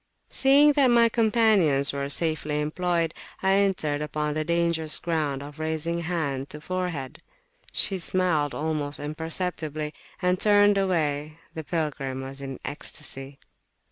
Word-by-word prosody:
Seeing 280 +2 +6
that 280 -2 +4
my 235 -1 +5
companions 215 - +3
were 140 0 -3
safely 150 -1 -1
employed, 165 +2 0 0.3
I 190 - +3
entered 180 -7 +1
upon 150 0 -2
the 155 +1 -1
dangerous 170 -1 +1
ground 150 -5 -2
of 145 +2 -11
raising 160 +2 -1
hand 155 -6 -2
to 150 - -8
forehead. 175 -5 -4 0.5
She 190 -2 0
smiled 170 -5 0
almost 150 -2 -2
imperceptibly, 155 0 -3 0.3
and 180 0 +1
turned 205 -1 +5
away. 155 -5 -1 0.2
The 160 - -5
pilgrim 140 -5 -3
was 135 +1 -8
in 135 -2 -6
ecstasy. 140 -1 -5
160 Hz, 130 wpm, -26 LUFS, 145-180 Hz, 0.5 s, Seeing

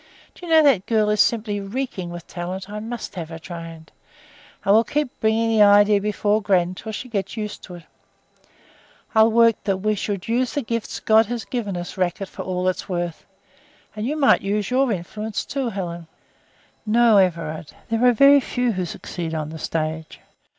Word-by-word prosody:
Do - - -18
you - - -5
know 320 -1 +7
that 260 -10 +3
girl 215 -2 +2
is 210 -1 +3
simply 215 -3 0
reeking 200 -3 -4
with 175 -1 -8
talent; 185 +2 -6
I 210 +1 -6
must 230 +2 -6
have 170 -4 -6
her 165 - -7
trained. 165 -1 -9 0.7
I 195 - +3
will 220 +3 +6
keep 295 +1 -3
bringing 220 +1 +1
the 220 -1 +3
idea 205 0 +6
before 210 +1 0
gran 185 -4 +2
until 200 +4 -7
she 235 +4 -6
gets 200 -2 -4
used 210 -1 -5
to 180 - -10
it. 175 - -12 1.3
I'll 220 0 +6
work 230 -1 +4
the 195 -2 0
we 215 +3 0
should 200 -2 -4
use 245 +2 0
the 285 - -1
gifts 230 -1 -4
God 220 0 +4
has 240 0 -4
given 210 -7 -3
us 175 +2 -7
racket 185 +2 -1
for - - -8
all 185 0 -2
it 185 - +1
is - - -9
worth, 175 -2 -4 0.7
and 215 +2 -3
you 300 +3 -2
might 280 -3 +4
use 205 +2 -2
your 260 0 +2
influence 210 +3 -4
too, 270 -4 -2
Helen." 175 -5 -5 0.8
"No, 230 0 +4
Everard; 165 -5 0 0.2
there 225 +1 0
are 250 - +7
very 275 +4 +6
few 245 -2 -1
who 185 -3 -2
succeed 165 0 -6
on 155 -1 -3
the 160 0 -8
stage. 160 0 -4
205 Hz, 190 wpm, -22 LUFS, 180-230 Hz, 1.3 s, know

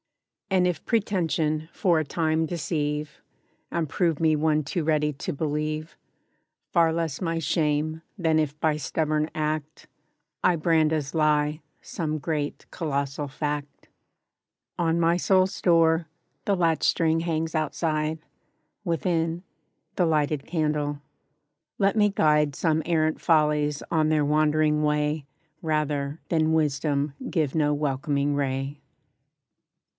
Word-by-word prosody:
And 185 -2 +3
if 175 -3 -2
pretention 165 -8 0
for 175 -5 +2
a - - 0
time 160 +1 0
deceive, 150 -2 -3 0.5
And 165 -2 -1
prove 165 +1 0
me 160 -1 +3
one 155 0 +2
too 160 +4 -2
ready 150 -1 +1
to 140 - -4
believe, 155 +1 -3 0.8
Far 165 -2 +4
less 160 -2 -2
my 165 -2 -1
shame, 155 0 0 0.2
than 160 -4 +2
if 150 -1 -2
by 155 -1 +1
stubborn 155 +1 -1
act, 155 0 -3 0.6
I 180 - +4
brand 160 -1 +3
as 150 -3 -2
lie, 150 -1 +2 0.2
some 155 -2 -3
great 150 -1 -3
colossal 140 -3 -2
Fact. 145 0 -4 0.9
On 170 -1 +1
my 170 +1 +3
soul's 185 +1 +2
door, 165 -1 +3 0.4
the 200 - +2
latch 165 -3 +1
string 165 -1 +2
hangs 165 -1 -2
outside; 155 0 -1 0.6
Within, 165 0 -1 0.5
the 180 - +2
lighted 150 -2 0
candle. 150 -3 -1 0.8
Let 200 0 +2
me 210 -1 +4
guide 150 -6 +2
Some 160 0 +1
errant 155 -2 +1
follies, 150 -2 +2
on 155 -2 +2
their 155 -2 +2
wandering 150 0 +2
way, 150 -1 0 0.3
Rather, 150 -2 -1
than 160 -1 +2
Wisdom 145 -2 0 0.2
give 155 -6 0
no 150 -2 +2
welcoming 145 0 0
ray. 135 0 -2
155 Hz, 125 wpm, -26 LUFS, 150-165 Hz, 0.9 s, Far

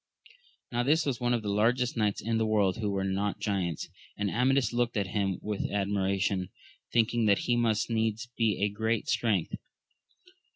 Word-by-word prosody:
Now 120 0 0
this 155 +6 +2
was 130 -5 -2
one 120 0 +1
of 115 - -3
the 100 - -1
largest 120 +4 +2
knights 105 -3 0
in 115 +1 0
the 110 - +1
world 105 -4 +2
who 110 -2 -1
were 100 -1 -1
not 100 +2 -1
giants, 95 -6 -2 0.3
and 100 -1 -1
Amadis 130 +1 +2
looked 120 -1 0
at 100 - +1
him 100 -3 0
with 105 -1 -2
admiration, 100 -1 0 0.4
thinking 115 0 +2
that 100 -1 +5
he 120 - +2
must 115 -3 +1
needs 110 0 -1
be 105 -3 +1
of 105 - -2
great 110 +1 0
st^'ength. 105 -8 0
105 Hz, 175 wpm, -29 LUFS, 100-120 Hz, 0.4 s, that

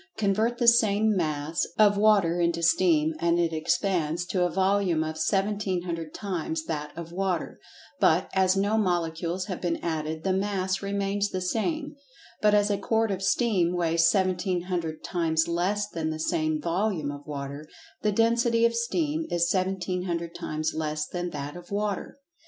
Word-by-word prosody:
Convert 220 +3 +1
the 240 -1 +1
same 220 -2 +4
"mass" 155 -2 -1
of 210 -1 +5
Water 200 -5 +3
into 170 -1 0
Steam, 160 -2 +3
and 170 +1 +2
it 170 -1 +1
expands 170 0 0
to 180 0 0
a 175 - +2
"volume" 190 -2 +1
of 155 0 -4
1700 180 -3 -1
times 165 -5 -3
that 150 -2 -4
of 170 -1 -7
Water—but, 185 -1 -1
as 190 0 +3
no 205 +3 +2
molecules 175 -1 -1
have 185 -2 -5
been 170 -2 0
added, 160 -1 -3
the 190 - +1
"mass" 190 -1 -1
remains 200 0 -1
the 185 - -3
same—but 265 - -2
as 205 0 +3
a 200 - 0
quart 225 +1 +1
of 190 -1 -3
Steam 195 -4 +1
weighs 165 -1 +3
1700 180 -3 -1
times 160 -3 0
less 185 +5 0
than 160 -1 -3
the 155 - -3
same 155 0 0
"volume" 170 -2 -1
of 145 +1 -10
Water, 140 +1 -6 0.3
the 210 - +1
"density" 230 +2 +3
of 235 - +2
Steam 305 +7 -1
is 170 0 +1
1700 180 -2 -2
times 155 +1 -3
less 155 -1 -2
than 175 +1 -4
that 145 -1 -6
of 175 0 -11
Water. 205 +2 -3
180 Hz, 155 wpm, -27 LUFS, 165-205 Hz, 0.3 s, of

